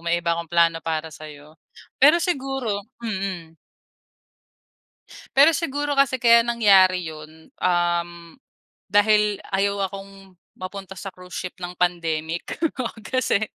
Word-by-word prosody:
may 170 0 -1
iba 170 - 0
akong 170 -1 -4
plano 170 -1 +3
para 160 0 -3
sa 155 +2 -10
'yo." 150 +1 -15 0.4
Pero 295 +5 +7
siguro 270 - -2 0.2
mm. 190 -7 -5 1.8
Pero 295 +3 +6
siguro 290 -3 -2
kasi 260 -2 +2
kaya 235 -1 +6
nangyari 190 -7 +4
'yun, 155 +1 -12
um, 175 -1 +1 0.8
dahil 210 0 +3
ayaw 200 0 0
akong 195 -2 -12 0.2
mapunta 195 +1 -8
sa 195 +1 -7
cruise 180 0 -12
ship 185 0 -6
ng 180 0 -6
pandemic. 165 -2 -2 0.5
Kasi 220 -1 0
190 Hz, 120 wpm, -23 LUFS, 170-215 Hz, 1.8 s, Pero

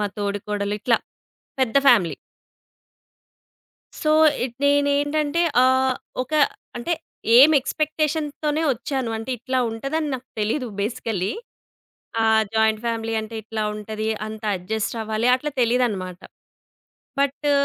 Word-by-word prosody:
మా 210 - +1
తోడికోడలు 205 0 -2
ఇట్లా 235 +2 +3 0.6
పెద్ద 260 0 +1
ఫ్యామిలీ. 205 -10 +4 1.9
సో, 305 - +1 0.3
ఇట్ 245 -2 -4
నేనేంటంటే 285 +2 +2 0.2
ఆహ్, 260 0 +3 0.3
ఒక 265 - -10 0.4
అంటే 245 +9 -1 0.4
ఏమి 300 +4 +8
ఎక్స్‌పెక్టేషన్‌తోనే 305 +1 -1
వచ్చాను. 255 0 -3
అంటే 225 +3 -7
ఇట్లా 255 +2 -1
ఉంటదని 275 +7 -2
నాకు 255 0 -12
తెలీదు. 235 +5 -1
బేసికల్లీ 210 -3 -2 0.9
ఆహ్, 220 0 +4
జాయింట్ 220 -1 +2
ఫ్యామిలీ 225 -1 -2
అంటే 220 +1 -8
ఇట్లా 220 0 -3
ఉంటది, 215 +1 -4 0.2
అంత 215 0 -8
అడ్జస్ట్ 220 +5 -3
అవ్వాలి 220 +2 -1
అట్లా 295 +3 -4
తెలీదనమాట. 215 -7 0 1.0
బట్టు 280 +1 +1
235 Hz, 110 wpm, -23 LUFS, 215-285 Hz, 1.9 s, ఏమి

